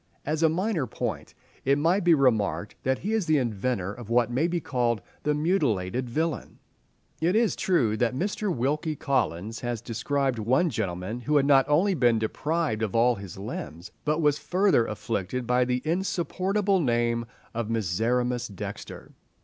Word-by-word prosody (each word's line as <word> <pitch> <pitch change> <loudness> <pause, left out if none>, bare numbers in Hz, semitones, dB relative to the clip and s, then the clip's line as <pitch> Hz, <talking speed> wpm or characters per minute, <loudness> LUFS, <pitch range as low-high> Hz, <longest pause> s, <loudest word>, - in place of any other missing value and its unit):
As 155 +2 -1
a 160 - +5
minor 175 - 0
point, - - -4 0.3
it 140 +1 +3
might 170 +6 +2
be 170 -1 +6
remarked 110 -7 +1
that 130 0 +1
he 215 - 0
is 220 -6 0
the 155 -1 +4
inventor 110 -5 -1
of 115 -1 -10
what 120 0 +2
may 140 +7 +1
be 175 0 -1
called 120 -7 0 0.2
the 150 0 +1
mutilated 130 - 0
villain. 160 +4 -2 0.6
It 175 +5 +2
is 225 -1 +3
true 125 - +2
that 120 +2 +1
Mr. 200 +5 -1
Wilkie 150 +3 -1
Collins 115 - -1
has 120 -2 -3
described 125 +3 -1
one 130 +10 +2
gentleman 95 0 -3
who 150 +4 +1
had 140 - +3
not 135 -1 +4
only 180 +7 +3
been 120 -8 +3
deprived 115 +2 -1
of 110 -2 -2
all 120 +2 +4
his 100 -5 -9
limbs, 95 -1 -7
but 155 +2 0
was 150 -1 +3
further 185 - +2
afflicted 110 +2 -3
by 125 +1 +2
the 125 0 -1
insupportable 190 +3 0
name 120 -4 +1 0.3
of 115 -1 -3
Miserrimus 120 +4 0
Dexter. 100 -4 -8
125 Hz, 165 wpm, -26 LUFS, 115-160 Hz, 0.6 s, be